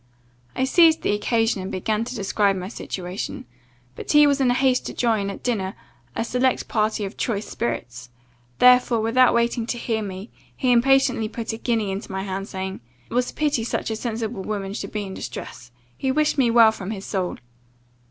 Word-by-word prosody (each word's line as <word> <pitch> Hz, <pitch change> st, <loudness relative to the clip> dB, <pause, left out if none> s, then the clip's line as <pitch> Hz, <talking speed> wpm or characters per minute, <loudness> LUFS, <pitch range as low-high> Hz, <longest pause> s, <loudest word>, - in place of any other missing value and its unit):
I -, -, 0 dB
seized 320 Hz, +3 st, +5 dB
the -, -, +2 dB
occasion, 225 Hz, 0 st, +1 dB
and 190 Hz, -, -5 dB
began 215 Hz, +4 st, -1 dB
to 250 Hz, +1 st, -6 dB
describe 200 Hz, -1 st, +1 dB
my 185 Hz, 0 st, -5 dB
situation; 185 Hz, -4 st, -5 dB, 0.5 s
but -, -, -5 dB
he 295 Hz, 0 st, +8 dB
was 280 Hz, -1 st, +2 dB
in 255 Hz, -, +3 dB
haste 255 Hz, +1 st, +2 dB
to -, -, -7 dB
join, 220 Hz, -5 st, +1 dB
at 195 Hz, -, -8 dB
dinner, 200 Hz, -6 st, -1 dB, 0.4 s
a -, -, 0 dB
select 250 Hz, +2 st, 0 dB
party 215 Hz, -1 st, 0 dB
of 195 Hz, -, -8 dB
choice 215 Hz, -4 st, -2 dB
spirits; 120 Hz, +1 st, -4 dB, 0.5 s
therefore, 250 Hz, -2 st, +5 dB
without 240 Hz, +3 st, +4 dB
waiting 235 Hz, 0 st, +1 dB
to 240 Hz, -, -2 dB
hear 225 Hz, -2 st, -2 dB
me, 195 Hz, +1 st, -7 dB, 0.3 s
he 255 Hz, -2 st, +2 dB
impatiently 255 Hz, -2 st, +3 dB
put 230 Hz, 0 st, -4 dB
a -, -, -4 dB
guinea 225 Hz, -4 st, -1 dB
into 195 Hz, +1 st, -5 dB
my 190 Hz, 0 st, -3 dB
hand, 195 Hz, 0 st, -4 dB
saying, 190 Hz, -1 st, -5 dB, 0.3 s
'It -, -, -6 dB
was 250 Hz, +1 st, +1 dB
a -, -, -10 dB
pity 295 Hz, -6 st, 0 dB
such 225 Hz, -, -2 dB
a -, -, -1 dB
sensible 225 Hz, -2 st, -3 dB
woman 200 Hz, -1 st, -4 dB
should -, -, -5 dB
be 210 Hz, -1 st, -3 dB
in 190 Hz, -1 st, -7 dB
distress 125 Hz, -3 st, -8 dB, 0.2 s
he 265 Hz, -, -1 dB
wished 300 Hz, +2 st, +2 dB
me 260 Hz, -4 st, +3 dB
well 230 Hz, -1 st, +7 dB
from 195 Hz, -3 st, -7 dB
his 205 Hz, -2 st, -5 dB
soul. 185 Hz, -3 st, -2 dB
220 Hz, 195 wpm, -23 LUFS, 195-245 Hz, 0.5 s, he